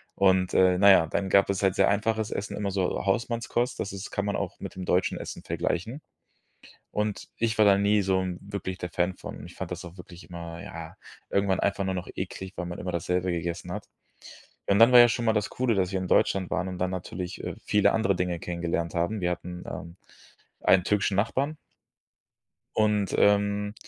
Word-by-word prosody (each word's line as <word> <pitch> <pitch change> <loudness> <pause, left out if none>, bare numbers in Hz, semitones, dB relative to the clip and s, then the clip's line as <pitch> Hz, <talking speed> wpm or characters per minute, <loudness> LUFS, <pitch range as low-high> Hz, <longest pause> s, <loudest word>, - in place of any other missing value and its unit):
Und, 95 -1 +3
äh, 90 -1 +4
na 100 +2 +6
ja, 85 -4 +6
dann 95 +3 -2
gab 100 +1 +4
es 100 -1 0
halt 95 -1 +3
sehr - - +4
einfaches 110 +1 0
Essen, 100 - -4
immer 100 -1 -2
so 95 +1 -1
Hausmannskost, 115 +4 -1
das 100 - -3
ist 100 +1 -7
kann 100 - -2
man 100 - -1
auch - - -4
mit - - -7
dem 95 -1 -5
deutschen 90 0 +1
Essen - - -7
vergleichen. 115 - -2 0.9
Und 105 -1 -2
ich 115 -1 -1
war 110 - +6
da 100 -1 +6
nie 105 +1 +3
so 95 -1 +1
'n 90 -1 -3
wirklich 100 -2 -5
der 90 - -4
Fan 90 +2 0
von. - - -9
Ich - - -13
fand - - -6
das - - -6
auch 85 +2 -11
wirklich 90 +1 -12
immer, 85 -1 -7
ja, - - -9 0.3
irgendwann 100 -1 +1
einfach 100 0 0
nur 95 - -1
noch 90 0 -5
eklig, 95 0 -5
weil 90 - -4
man 85 0 -6
immer 90 0 -4
dasselbe 90 +2 -1
gegessen 85 0 -4
hat. - - -6 0.8
Und 100 +1 +3
dann 115 +2 +8
war 125 - +10
ja 120 0 +8
schon 120 +1 -1
mal 110 - +3
das 105 -1 0
Coole, 125 -3 0
dass 95 -1 0
wir 95 - -1
in 95 - -4
Deutschland 95 0 +2
waren 90 - -1
und 90 - -6
dann 90 +1 -1
natürlich, 90 0 -5
äh, - - -4
viele 105 -1 +3
andere 100 -4 +1
Dinge 90 -1 -1
kennengelernt 85 -1 -2
haben. 85 +6 0
Wir 90 0 +1
hatten, 90 0 -6
ähm, 85 +2 -7 0.7
einen 95 -2 +5
türkischen 100 0 +1
Nachbarn 135 +9 0 1.2
und, 105 -2 +2
ähm, 105 0 +2
95 Hz, 210 wpm, -27 LUFS, 90-105 Hz, 1.2 s, war